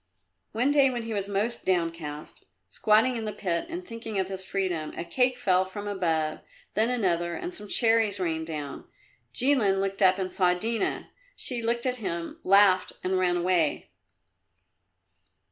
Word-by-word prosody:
One 245 +6 +1
day 280 -2 +5
when 240 -2 -3
he 225 0 -5
was 200 -2 -2
most 210 +4 -2
downcast, 165 -4 -3 0.2
squatting 225 +4 +3
in 225 - -4
the 215 - -2
pit 175 - -2
and 350 +2 -6
thinking 225 -2 -6
of 190 -1 -1
his 190 -1 -4
freedom, 180 -5 -2
a - - -4
cake 250 +8 +1
fell 185 -7 +2
from 205 +2 -7
above, 165 -6 -1 0.3
then 220 +3 +2
another, 175 -8 0
and 175 - -5
some 210 - -7
cherries 225 -2 +3
rained 160 -3 -2
down. 150 -3 -6 0.5
Jilin 240 -8 +4
looked 195 +1 -2
up 185 -1 +5
and 185 -1 -3
saw 180 -2 +2
Dina. 225 +5 -2 0.2
She 245 -2 0
looked 235 +1 -1
at 255 -1 0
him, 170 -6 -5
laughed 195 -1 +4
and 185 0 0
ran 180 -1 +2
away. 175 -3 0
195 Hz, 160 wpm, -27 LUFS, 175-230 Hz, 0.5 s, day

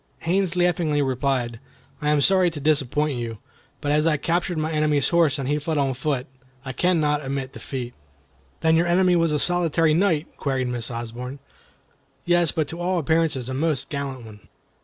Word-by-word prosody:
Haines 180 +1 +1
laughingly 175 -4 +1
replied: 130 -3 -1 0.4
"I 150 - 0
am 150 -1 +3
sorry 185 +2 +4
to 160 -3 -7
disappoint 145 -1 +1
you; 115 -2 -5 0.4
but 145 -1 -1
as 150 +2 +3
I 155 -2 +3
captured 170 +3 -1
my 155 +1 -1
enemy's 150 -3 +2
horse 170 -5 +3
and 135 -2 -3
he 145 +2 +1
fled 155 +1 -2
on 135 -2 +1
foot, 130 0 -2 0.4
I 130 - -4
cannot 150 -2 +1
admit 135 -1 -4
defeat." 125 -3 -6 0.7
"Then 160 0 +4
your 170 +2 +2
enemy 180 +1 +3
was 165 -2 +2
a 150 - +1
solitary 165 -1 +2
knight?" 165 -3 0
queried 130 -3 -1
Miss 120 0 -2
Osborne. 120 +3 -6 0.9
"Yes, 175 -2 +3
but 155 -3 -1
to 165 - -7
all 180 +1 0
appearances 160 -5 +1
a 130 - -4
most 150 0 -1
gallant 135 -4 -4
one." 105 -2 -12
150 Hz, 180 wpm, -23 LUFS, 135-165 Hz, 0.9 s, sorry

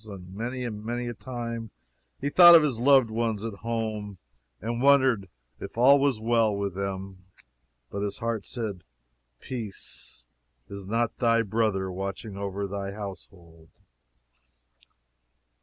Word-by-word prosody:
And 95 -3 -10
many 120 +5 -4
and 105 -3 -5
many 120 +2 -3
a - - -4
time 115 -2 -6 0.5
he 140 - -1
thought 175 0 +10
of 160 - +7
his 135 -7 -1
loved 130 -2 +5
ones 110 -2 -1
at 110 -3 -5
home, 110 -3 -3 0.4
and 115 +4 -3
wondered 130 -7 +4 0.3
if - - -8
all 135 +4 +7
was 135 -5 +1
well 115 -2 +2
with 100 -1 -2
them. 95 -1 -5 0.7
But 100 - -4
his 100 -1 -3
heart 115 -3 -3
said, 105 -7 -5 0.6
Peace, 105 - -7 0.4
is 100 -1 -8
not 115 +2 0
thy 115 -1 +3
brother 100 -3 0
watching 100 +3 -5
over 100 0 -3
thy 100 0 -4
household? 90 -5 -10
110 Hz, 135 wpm, -27 LUFS, 100-120 Hz, 0.7 s, thought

